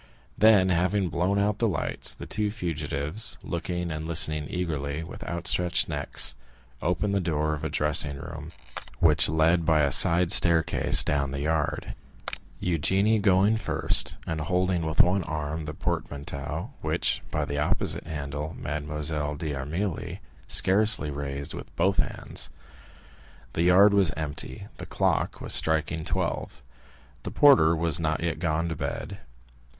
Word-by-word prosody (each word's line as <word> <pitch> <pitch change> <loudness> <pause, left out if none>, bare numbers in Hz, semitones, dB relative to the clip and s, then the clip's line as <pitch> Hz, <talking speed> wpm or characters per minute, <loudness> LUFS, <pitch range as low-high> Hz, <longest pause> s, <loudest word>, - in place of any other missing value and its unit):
Then, 105 -4 +5
having 90 +2 +1
blown 90 +5 0
out 105 +1 0
the 115 - +2
lights, 95 - -2
the - - -9
two 105 -1 -1
fugitives, 80 -1 -3
looking 85 0 -3
and 80 0 -5
listening 75 -2 +1
eagerly, 75 -4 -3
with - - -9
outstretched 85 0 0
necks, - - -2 0.5
opened 90 +4 -1
the 100 - +1
door 75 -2 -1
of 75 - -6
a - - -2
dressing 75 -1 +2
room 70 - -8 0.5
which 75 -4 +4
led 80 +2 +2
by 80 -1 +3
a 70 -1 +2
side 85 +5 +5
staircase 85 -1 +5
down 70 -1 0
to - - -7
the 70 - -3
yard,—Eugénie 80 - -2
going 100 +2 +3
first, - - 0
and 80 -1 -3
holding 90 0 0
with 80 - +4
one 95 +2 +2
arm 75 0 -4
the 75 - -5
portmanteau, 75 - -4
which 80 +2 0
by 75 -1 -1
the 70 0 -3
opposite 75 - -1
handle 75 0 -5
Mademoiselle 75 0 -3
d'Armilly 75 +5 -4 0.3
scarcely 100 -5 +3
raised 70 0 -4
with - - -10
both 95 +1 +1
hands. - - -2 1.0
The - - -1
yard 95 +4 +6
was 100 -4 +4
empty; 80 +6 -5
the - - -8
clock - - 0
was - - +1
striking 80 0 +1
twelve. - - -3 0.6
The - - -5
porter 130 - +5
was 85 -1 +1
not 80 0 -1
yet 80 -3 -2
gone 80 -1 -1
to 80 - -3
bed. 100 +6 -5
80 Hz, 145 wpm, -26 LUFS, 75-90 Hz, 1.0 s, yard